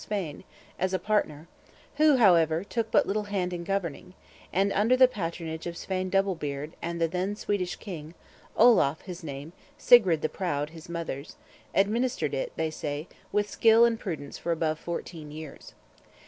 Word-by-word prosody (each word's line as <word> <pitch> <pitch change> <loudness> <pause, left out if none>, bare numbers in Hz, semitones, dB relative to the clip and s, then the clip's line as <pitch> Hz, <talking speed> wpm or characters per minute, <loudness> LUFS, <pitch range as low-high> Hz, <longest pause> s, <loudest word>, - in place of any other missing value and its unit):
Svein, 190 -8 -4 0.4
as 185 +1 +1
partner, 170 -6 -1 0.5
who, 300 -2 +5
however, 170 -6 +4
took 225 +2 -2
but - - +4
little 210 +1 -1
hand 190 -3 -2
in 170 -1 -4
governing; 185 -2 -3 0.4
and, 195 +2 +1
under 225 +5 +3
the 255 0 +8
patronage 165 -6 -5
of 170 -1 -5
Svein 185 -1 -3
Double 195 0 +2
Beard 145 -2 -5
and 170 0 -3
the 165 - +2
then 185 +4 -2
Swedish 190 -4 -2
king 165 -5 -8 0.4
(Olaf 215 - +5
his 180 -1 -8
name, 145 +2 -7 0.2
Sigrid 190 -10 +5
the - - +3
Proud, 150 -5 -2
his 165 0 -12
mother's), 165 -4 -5 0.4
administered 235 +6 +1
it, - - -2
they 160 -1 -1
say, 150 +1 -4 0.2
with 205 0 +1
skill 225 +2 +5
and 230 -1 +1
prudence 155 -9 -6
for 170 - -2
above 160 -1 0
fourteen 165 -3 -6
years. 155 -1 -10
180 Hz, 160 wpm, -28 LUFS, 160-205 Hz, 0.5 s, the